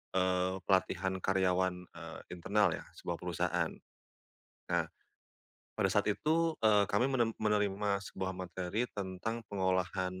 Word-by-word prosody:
eee, 95 0 +2
pelatihan 95 0 +2
karyawan, 95 -1 +2
eee, 80 -1 -8
internal 95 +2 +2
ya, - - -8
sebuah 85 - -3
perusahaan. 90 -2 0 1.0
Nah, - - +3 0.9
pada - - +3
saat - - +2
itu, 160 +9 +2
eee, 105 -2 +6
kami 125 - +2
menen 120 -4 +2
menerima 105 -1 +2
sebuah 95 0 -3
materi 95 +5 -2
tentang 100 +4 -3
pengolahan 95 -1 0
95 Hz, 120 wpm, -33 LUFS, 90-105 Hz, 1.0 s, eee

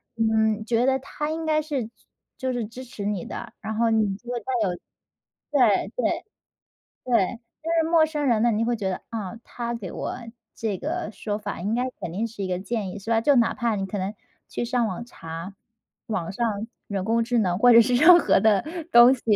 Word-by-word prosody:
嗯， 220 -1 +2
觉 235 +1 +2
得 265 0 +3
他 295 +3 -5
应 325 0 -3
该 310 0 +2
是 275 -7 -3 0.5
就 260 -1 -2
是 240 -3 -2
支 240 +4 -9
持 215 -4 -8
你 205 -3 -2
的， - - -7
然 220 0 -5
后 230 0 +2
你 215 -3 +2
就 240 +5 -9
会 240 - -2
再 - - -20 0.2
有 175 - -2 0.8
对 245 -8 +3
对， - - -1 0.8
对。 235 -2 +1 0.2
就 330 - -3
是 320 - -2
陌 330 -2 +5
生 300 -2 -2
人 230 -3 +3
呢， 235 - +4
你 220 +2 +1
会 240 0 +1
觉 200 -3 -2
得， 185 - -4
啊， 220 -2 -5
他 235 -1 -5
给 210 -6 -5
我 - - -4 0.4
这 215 -4 -3
个 340 - -3
说 205 +1 -3
法 205 -4 -5
应 205 +5 -1
该 245 - +1 0.2
肯 170 - -4
定 210 +7 -2
是 215 -3 -7
一 190 - -2
个 180 -1 -2
建 200 -1 -3
议， 205 - -7
是 200 - -9
吧？ 225 -1 +3
就 285 +3 +4
哪 235 - +3
怕 235 -3 0
你 195 -1 -2
可 200 +2 -4
能 195 +2 -2 0.4
去 - - -3
上 245 -1 +1
网 215 +2 -4
查， 165 -4 -8 0.5
网 185 -7 -2
上 220 -1 -1 0.2
人 195 -2 -3
工 230 +1 +2
智 240 +1 0
能 185 -5 +1
或 245 +3 +6
者 230 0 +9
是 245 +2 +2
任 340 +6 +8
何 195 - +3
的 215 0 +3 0.3
东 240 +2 +8
西， 255 - -6
225 Hz, 235 characters per minute, -25 LUFS, 205-245 Hz, 0.8 s, 者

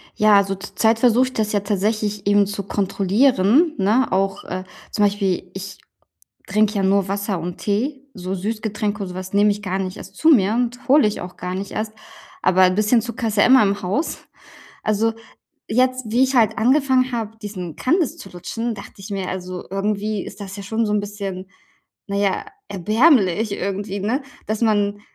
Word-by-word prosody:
Ja, 215 -1 +5
also, 195 0 +1
zur 195 - -10
Zeit 225 0 +3
versuche 245 +1 +4
ich 260 - -8
das 215 -1 -1
ja 205 - +2
tatsächlich 205 +1 -1
eben 205 0 +4
zu 200 0 -4
kontrollieren, 205 - +2
ne, 220 +7 +2
auch, 195 0 0
äh, 185 +1 -4 0.3
zum 210 - +1
Beispiel, 195 -3 -1
ich 195 +1 -7 0.7
trinke 215 +2 +2
ja 200 - 0
nur 195 0 +2
Wasser 200 -1 -2
und 175 +1 -5
Tee, 265 +7 -2
so 185 -2 -5
Süßgetränke 210 +1 -3
und 190 - -6
sowas 185 +1 -7
nehme 205 +1 +4
ich 205 0 -4
gar 190 -1 -2
nicht 185 -1 -4
erst - - -11
zu 320 - +3
mir 215 -9 +5
und 245 +2 -2
hole 280 -3 +6
ich 210 - -3
auch 180 +1 -8
gar 180 0 -4
nicht 195 +1 -5
erst. 215 0 -3 0.5
Aber 185 +1 +3
'n 185 0 +4
bisschen 215 +3 +3
Zucker 235 +1 -4
ist 210 -1 -3
ja - - +6
immer 260 -2 +7
im 200 0 0
Haus. 200 - -2 0.6
Also, 220 +1 +1 0.5
jetzt 255 +3 +1
wie 250 +3 +4
ich 265 +1 0
halt 220 -3 +3
angefangen 260 +1 +3
habe, 225 -2 -4
diesen 185 -6 -6
Kandis 325 +1 +1
zu 195 - -11
lutschen, 225 +6 -4
dachte 200 - -11
ich 195 - -9
mir: 195 -2 -3
„Also, 185 -1 -5
irgendwie 205 +1 -2
ist 200 - -10
das 195 0 -7
ja 200 - -7
schon 220 +3 -1
so 210 - -1
'n 210 - +2
bisschen, 200 -2 -5 0.6
na 200 - -3
ja, 200 -1 0 0.2
erbärmlich 215 - +3
irgendwie“, 200 0 -3
ne, 230 +8 -1 0.2
dass 215 0 -2
man 205 -2 +1
205 Hz, 195 wpm, -21 LUFS, 195-225 Hz, 0.7 s, immer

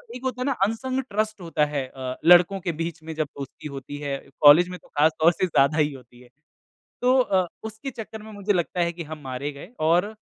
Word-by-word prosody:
एक 255 - -9
होता 255 -1 -3
है - - 0
ना 280 - +2
अनसंग 260 +5 -2
ट्रस्ट 215 -1 -1
होता 165 -3 +1
है 145 -3 -3
अ, 130 -1 -6
लड़कों 180 +3 +6
के 170 - -1
बीच 165 -1 -4
में 160 0 -6
जब 155 -2 -1
दोस्ती 140 +2 -7
होती 135 +1 -7
है, 145 -1 -3 0.2
कॉलेज 155 +5 +8
में 180 - -7
तो - - -22
ख़ासतौर 160 +3 +3
से 185 - 0
ज़्यादा 150 -1 +3
ही 150 -1 +2
होती 125 -2 -15
है। 125 - -18 0.7
तो 255 +1 +4
अ, 190 -7 +2 0.2
उसके 220 +5 -6
चक्कर 220 -2 -8
में 220 - -10
मुझे 205 0 -1
लगता 175 0 -1
है 170 0 0
कि 170 0 -6
हम 155 0 -8
मारे 135 +3 -4
गए। 140 +7 -11 0.2
और 180 +6 +2
170 Hz, 225 wpm, -24 LUFS, 145-210 Hz, 0.7 s, कॉलेज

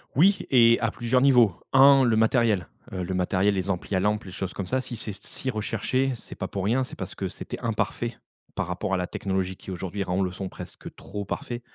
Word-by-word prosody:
Oui 195 +7 +5
et 115 -2 +6
à 115 - +1
plusieurs 120 +3 +1
niveaux. 125 -7 +5 0.2
1 135 0 +7
le 120 -3 +3
matériel, 110 - +3 0.2
heu, 95 -1 -3
le 90 +2 -3
matériel, 95 +2 +2
les 95 0 -2
amplis 95 +1 -2
à 95 - +3
lampes, 105 +2 +1
les 95 - -9
choses 95 -1 -4
comme 100 - -4
ça, 130 +7 0
si 125 -1 -7
c'est 110 -1 -5
si 130 +6 -4
recherché, 115 +4 -1
c'est 115 - -10
pas 95 - -4
pour 95 0 -4
rien. 120 +6 +2
C'est - - -7
parce - - -5
que, - - -3
c'était - - -7
imparfait, - - -2 0.4
par - - -1
rapport 95 +2 -2
à - - +1
la 90 - -1
technologie, 95 -1 -2
qui, - - -12
aujourd'hui, 95 +2 -4
rend 90 0 -1
le 90 - -1
son 95 0 -5
presque - - -9
trop 100 +1 -6
parfait, 120 +4 -4
105 Hz, 230 wpm, -26 LUFS, 95-120 Hz, 0.4 s, 1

